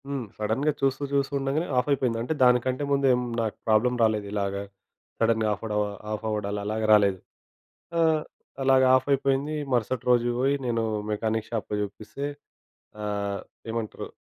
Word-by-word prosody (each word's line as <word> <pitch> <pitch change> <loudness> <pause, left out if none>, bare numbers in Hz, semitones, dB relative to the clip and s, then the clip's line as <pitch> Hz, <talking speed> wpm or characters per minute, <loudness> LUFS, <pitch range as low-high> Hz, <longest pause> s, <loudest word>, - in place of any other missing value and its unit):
హ్మ్. 140 -2 -3
సడెన్‌గా 110 +8 +1
చూస్తూ 135 +1 +1
చూస్తూ 140 0 +1
ఉండగానే 135 +5 0
ఆఫ్ 125 - +2
అయిపోయింది. 125 -4 +1
అంటే 125 +7 -1
దానికంటే 125 +2 +3
ముందు 140 -1 +3 0.3
నాకు 110 -2 -2
ప్రాబ్లమ్ 115 +3 +3
రాలేదు 110 -2 +2
ఇలాగా 100 -1 -1 0.6
సడెన్‌గా 110 -1 +2
ఆఫ్ 100 - -8
అవడ 110 - -3 0.4
ఆఫ్ 105 0 -3
అవ్వడాలు 105 -1 -2
అలాగా 110 +1 -1
రాలేదు. 100 -3 +4 0.8
ఆహ్, 160 -2 +3 0.4
అలాగ 130 0 +5
ఆఫ్ 130 +1 +1
అయిపోయింది. 140 +2 0 0.2
మరుసటి 120 +1 0
రోజు 120 0 +3
పోయి 135 +2 +3
నేను 115 -1 0 0.3
మెకానిక్ 110 +1 -1
షాప్‌లో 105 -2 -2
చూపిస్తే. 110 +7 -6 0.8
ఆహ్, 100 -1 -2 0.3
ఏమంటారు. 115 -2 -4
115 Hz, 145 wpm, -26 LUFS, 105-135 Hz, 0.8 s, అలాగ